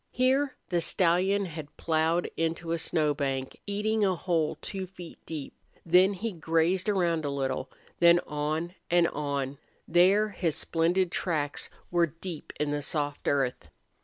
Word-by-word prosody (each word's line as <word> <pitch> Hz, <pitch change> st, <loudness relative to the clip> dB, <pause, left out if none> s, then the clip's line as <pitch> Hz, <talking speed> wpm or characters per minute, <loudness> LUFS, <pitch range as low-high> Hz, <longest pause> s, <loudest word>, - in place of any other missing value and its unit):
Here 260 Hz, +2 st, +2 dB
the 175 Hz, -2 st, +1 dB
stallion 185 Hz, +4 st, +2 dB
had 155 Hz, -4 st, -8 dB
plowed 160 Hz, +1 st, +1 dB
into 165 Hz, +1 st, -2 dB
a 170 Hz, -, 0 dB
snow 155 Hz, -3 st, +1 dB
bank, 135 Hz, -2 st, -3 dB
eating 210 Hz, +2 st, 0 dB
a 190 Hz, -2 st, +3 dB
hole 165 Hz, -3 st, 0 dB
two 190 Hz, -1 st, -5 dB
feet 180 Hz, -2 st, -11 dB
deep; 155 Hz, -4 st, -6 dB, 0.3 s
then 180 Hz, +3 st, +5 dB
he 215 Hz, +4 st, -3 dB
had 170 Hz, -4 st, -14 dB
grazed 165 Hz, +5 st, +2 dB
around 170 Hz, -5 st, +1 dB
a 145 Hz, -, -1 dB
little; 135 Hz, -1 st, -2 dB, 0.3 s
then 170 Hz, 0 st, +7 dB
on 155 Hz, +4 st, -2 dB, 0.2 s
and 175 Hz, 0 st, +4 dB
on; 140 Hz, -2 st, -3 dB, 0.3 s
there 195 Hz, +5 st, +4 dB
his 175 Hz, -6 st, -1 dB
splendid 170 Hz, +2 st, +1 dB
tracks 150 Hz, -5 st, -1 dB, 0.2 s
were 175 Hz, -1 st, +3 dB
deep 165 Hz, 0 st, -8 dB
in 150 Hz, -1 st, 0 dB
the 145 Hz, 0 st, -1 dB
soft 145 Hz, -1 st, -2 dB
earth. 135 Hz, -3 st, 0 dB
170 Hz, 155 wpm, -28 LUFS, 150-185 Hz, 0.3 s, then